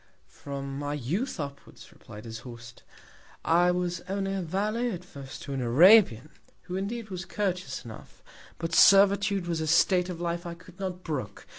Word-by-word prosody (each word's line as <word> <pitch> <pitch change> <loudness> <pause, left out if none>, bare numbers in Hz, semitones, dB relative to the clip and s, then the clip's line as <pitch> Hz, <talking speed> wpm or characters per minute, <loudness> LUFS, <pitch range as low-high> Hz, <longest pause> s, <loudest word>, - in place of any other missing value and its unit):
From 140 -1 -6
my 145 0 -3
Youth 165 - -3
upwards, 140 -1 -8
replied 105 +2 -12
his 115 0 -7
Host, 120 -1 -11 0.6
I 175 +2 +4
was 180 -1 -1
only 195 0 -2
a 195 - -2
Valet 210 +8 -1
at 180 -4 -6
first 140 -5 -10
to 140 - -6
an 135 - -2
Arabian, 150 - +5 0.3
who 180 0 -6
indeed 215 +3 -4
was 185 0 -4
courteous 180 -7 -3
enough; 110 -2 -12 0.3
but 165 0 -4
Servitude 200 0 +5
was 170 -2 -2
a 160 - -2
State 180 +3 +3
of 175 -2 -6
Life 170 0 -2
I 170 -2 -6
could 180 +1 -17
not 185 -2 -5
brook. 130 - -5
175 Hz, 170 wpm, -28 LUFS, 140-195 Hz, 0.6 s, Arabian